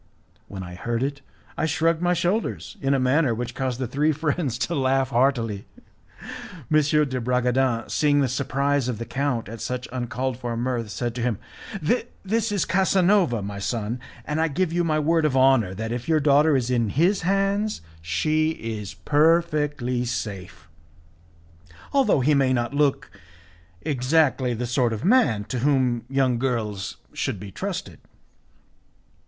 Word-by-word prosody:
When 95 -2 -7
I 90 0 -8
heard 115 +6 -2
it, 140 0 -3 0.3
I 160 - 0
shrugged 165 +1 +1
my 180 0 +2
shoulders 175 - -1
in 140 0 +2
a - - +1
manner 130 -1 +2
which 120 +1 -4
caused 130 -2 -2
the 130 - -1
three 145 +6 +1
friends 150 -4 -1
to 170 - -4
laugh 135 -2 +1
heartily. 115 -5 +1 1.1
M. 155 - +6 0.3
de 130 -1 -3
Bragadin, 125 -1 +1
seeing 145 -2 +2
the 140 - +3
surprise 140 +1 0
of 125 -3 -2
the 115 - -5
count 135 -4 -2
at 115 +1 -8
such 125 0 -3
uncalled 125 0 -3
for 120 -2 -3
mirth, 120 -2 -2
said 120 +2 -3
to 125 - -5
him, 115 -3 0 0.9
"This 225 +2 0
is 200 -3 +1
Casanova 185 - +2
my 100 0 -5
son, 115 +3 -2 0.3
and 150 +1 -1
I 165 - +3
give 165 +3 -1
you 175 0 +1
my 155 -2 +1
word 160 +2 +2
of 145 -4 +1
honour 130 -8 +4
that, 110 +3 -4
if 120 +5 -4
your 160 -1 +4
daughter 145 +1 +4
is 125 -1 -1
in 115 -3 +1
his 175 - +2
hands, 195 - 0 0.2
she 155 - +1 0.3
is 100 -2 -8
perfectly 150 -5 +1
safe, 95 -8 -5 1.3
although 260 - +3
he 150 +4 +3
may 135 -2 +3
not 120 +1 -1
look 145 -1 +1 0.7
exactly 130 -2 +1
the 125 +2 -3
sort 120 -1 +1
of 110 - -4
man 155 - +3
to 125 +4 -4
whom 130 -3 +1
young 130 -3 +1
girls 110 -6 -2 0.2
should 100 - -2
be 100 +1 -8
trusted." - - -5
130 Hz, 160 wpm, -24 LUFS, 120-155 Hz, 1.3 s, M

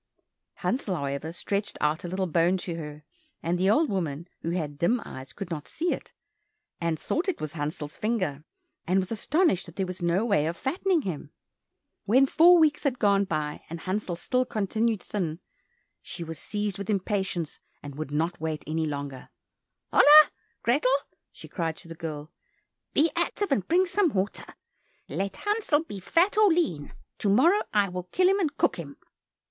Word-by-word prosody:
Hansel, 220 -7 -1
however, 140 +1 -3
stretched 200 +4 -3
out 150 +2 0
a - - -4
little 185 +2 -1
bone 175 +2 +2
to 175 -1 -4
her, 150 -2 -7 0.4
and 175 +2 0
the 190 +1 +3
old 305 +9 +4
woman, 170 - -3
who 165 - -3
had 155 -5 -3
dim 230 +9 +2
eyes, 130 -1 -9
could 180 +6 -7
not 150 -3 -4
see 345 +2 -1
it, - - -8 0.7
and 170 -2 0
thought 355 +5 -1
it 370 - -2
was 155 -1 -4
Hansel's 150 0 -4
finger, 185 -11 -1 0.4
and 185 +2 +3
was 190 +1 0
astonished 250 - +1
that 170 - -12
there 190 - -1
was 185 -1 -7
no 175 +5 +1
way 200 -9 +2
of 170 +1 -3
fattening 340 +4 0
him. 170 -7 -5 0.8
When 255 +6 +5
four 345 +6 +6
weeks 310 -3 +3
had 270 -4 0
gone 200 -3 +3
by, 150 -4 -3
and 165 0 -6
Hansel 190 -1 -2
still 255 +9 0
continued 220 -1 -1
thin, 170 -6 -3 0.6
she 170 - -7
was 160 -2 -6
seized 205 -2 -3
with 200 - -6
impatience 190 -5 -1 0.2
and 145 -1 -7
would 155 +1 -5
not 160 +3 -1
wait 160 -2 -3
any 160 +1 -1
longer. 140 -3 -5 0.6
"Hola, 300 +1 +9 0.3
Grethel," 255 +2 +3 0.4
she - - -12
cried 165 -3 -3
to 170 - -13
the 165 - -7
girl, 155 -2 -6 0.6
"be 315 +3 +4
active, 410 -6 -1
and 205 -9 +1
bring 365 +3 +4
some 370 0 +2
water. 195 +1 -1 0.6
Let 195 0 -3
Hansel 410 -8 +1
be 205 -11 -8
fat 350 - +2
or 420 -3 +6
lean, 290 - 0 0.3
to 205 - +1
morrow 330 - +5
I 205 -2 +3
will 180 0 -5
kill 365 - +2
him, 390 +2 +3
and 305 -6 -1
cook - - +2
him." 140 -5 -8
190 Hz, 180 wpm, -27 LUFS, 160-255 Hz, 0.8 s, Hola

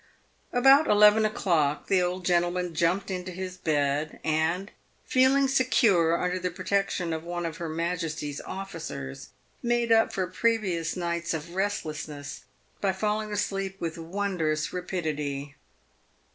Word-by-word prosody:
About 270 +5 +6
eleven 210 +1 +6
o'clock, 165 -9 +1
the 190 -2 +3
old 180 0 -2
gentleman 175 0 +1
jumped 180 +5 +1
into 185 0 -4
his 185 0 -5
bed, 150 -3 0
and, 160 +6 0 0.3
feeling 265 +2 +4
secure 215 -11 +3
under 180 +1 -1
the 180 0 -1
protection 185 -1 -1
of 160 0 -4
one 175 0 -4
of 165 -1 -4
her 170 -3 -4
Majesty's 160 -3 -3
officers, 165 - -7 0.3
made 240 -1 +1
up 225 0 +5
for 190 - -1
previous 185 -4 0
nights 170 -1 -2
of 160 +2 -6
restlessness 155 -7 -4 0.4
by 195 -2 +2
falling 210 +2 -1
to 205 - -3
sleep 195 -1 -2
with 165 -1 -3
wondrous 165 -3 -1
rapidity. 150 -6 -3
180 Hz, 130 wpm, -27 LUFS, 160-200 Hz, 0.4 s, About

